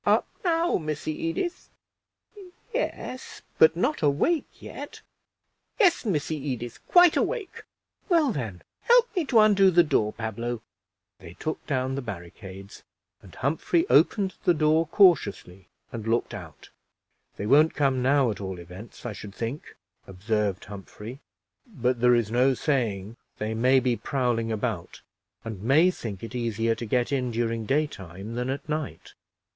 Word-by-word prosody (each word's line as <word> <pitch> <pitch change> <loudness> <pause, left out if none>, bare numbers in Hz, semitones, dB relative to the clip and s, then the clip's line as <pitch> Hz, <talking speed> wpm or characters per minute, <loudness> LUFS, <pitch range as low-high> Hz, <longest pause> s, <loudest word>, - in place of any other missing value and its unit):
"Up - - +3 0.2
now, 340 -1 +2
Missy 155 -1 -3 0.2
Edith." 345 - -3 1.0
"Yes, 430 - -4 0.2
but 160 0 +7
not 250 - 0
awake 160 - +1
yet." - - -9 0.8
"Yes, 365 - +4
Missy 160 -5 -1
Edith, 120 -6 -5
quite 355 -2 +6
awake." 455 -7 -2 0.5
"Well, 325 -7 +4
then, 110 - -5 0.2
help 480 -1 +4
me 350 -4 +1
to 255 -4 +2
undo 200 -3 +6
the 175 -1 +5
door, 105 -9 +1
Pablo." 115 +1 -4 0.6
They 85 +1 -12
took 155 +7 -4
down 130 -2 -1
the 140 - -3
barricades, 95 -2 -9 0.4
and - - -15
Humphrey 160 - 0
opened 195 -3 +4
the 175 - +3
door 155 +2 +2
cautiously, 160 - +2 0.2
and 115 -2 -6
looked 115 +1 0
out. - - -10 0.7
"They 100 - -4
won't 150 +7 +4
come 135 -3 +1
now, 135 -1 +3
at 100 - -7
all 95 -1 -5
events, 90 +8 -11
I 120 - -3
should 105 0 -10
think," 120 +6 -5 0.3
observed 100 0 -2
Humphrey; 105 +5 -9 0.5
"but 125 - -1
there 125 0 +5
is 115 -3 0
no 130 +3 +3
saying 115 -7 -1 0.2
they 110 +1 -3
may 130 +4 +4
be 125 -1 +1
prowling 120 -4 -1
about, 105 -5 -4 0.4
and 110 -4 -6
may 150 - +4
think 110 - -7
it 115 - -7
easier 115 -2 0
to 115 0 -6
get 125 +4 0
in 130 -3 0
during 115 -1 -2
daytime 105 - -3
than 125 +2 -2
at 135 +2 -4
night. 155 -2 -5
125 Hz, 145 wpm, -26 LUFS, 110-160 Hz, 1.0 s, but